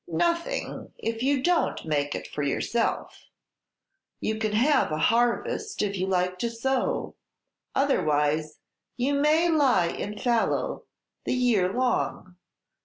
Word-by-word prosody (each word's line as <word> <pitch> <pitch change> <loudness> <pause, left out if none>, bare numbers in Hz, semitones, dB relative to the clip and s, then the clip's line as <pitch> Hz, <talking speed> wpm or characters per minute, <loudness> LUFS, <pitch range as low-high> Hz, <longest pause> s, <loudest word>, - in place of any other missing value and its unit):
"Nothing, 340 +8 -2
if 225 0 -3
you 270 0 +1
don't 350 - +1
make 145 -2 -1
it - - -5
for 150 - -5
yourself. 225 +11 -1 0.9
You 220 0 -2
can 215 -1 -1
have 255 - +3
a 155 - -1
harvest 240 - +1
if 200 -1 -1
you 185 0 -1
like 180 -1 0
to 235 - -1
sow. 255 +3 -1 0.6
Otherwise, 155 - +1 0.4
you 260 +3 +1
may 305 +4 +3
lie 270 - +3
in 210 +4 -5
fallow 235 +1 0 0.4
the - - 0
year 225 -8 +2
long. 245 -6 -1
230 Hz, 125 wpm, -26 LUFS, 180-275 Hz, 0.9 s, have